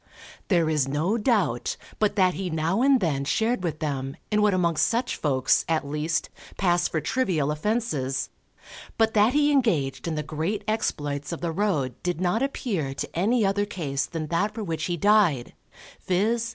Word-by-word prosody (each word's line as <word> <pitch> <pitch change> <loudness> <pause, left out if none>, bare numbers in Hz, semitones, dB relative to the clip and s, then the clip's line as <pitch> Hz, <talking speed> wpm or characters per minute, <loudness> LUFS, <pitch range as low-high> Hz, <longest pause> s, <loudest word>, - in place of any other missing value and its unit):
There 170 -5 +3
is 150 -4 +1
no 155 +9 0
doubt, 210 - 0 0.2
but 210 -1 +1
that 185 -3 +3
he 190 -1 -3
now 165 +6 0
and 270 0 +5
then 150 -8 0
shared 225 - 0
with 165 -3 -2
them 140 -3 -3
in 210 0 +3
what 210 0 +4
amongst 170 -3 +2
such 240 +2 -1
folks, 130 -4 +2
at 155 -3 0
least, 150 +3 -2 0.3
pass 175 -2 +2
for 160 - -1
trivial 165 - 0
offences, 150 - -1 0.7
but 225 -1 +3
that 215 +3 +4
he 295 0 +3
engaged 175 - +1
in 165 - -1
the 150 - -2
great 165 +8 -3
exploits 145 -9 -2
of 170 - -5
the 170 -1 -1
road 160 -9 0
did 175 -2 -2
not 185 +5 +1
appear 200 - -2
to - - -5
any 215 +6 +2
other 200 +1 +1
case 150 -8 -2
than 165 -2 -4
that 205 +6 0
for 225 - -4
which 160 -4 -3
he 175 0 -2
died, 195 - +3 0.5
viz. 225 +5 +1
175 Hz, 180 wpm, -25 LUFS, 150-215 Hz, 0.7 s, and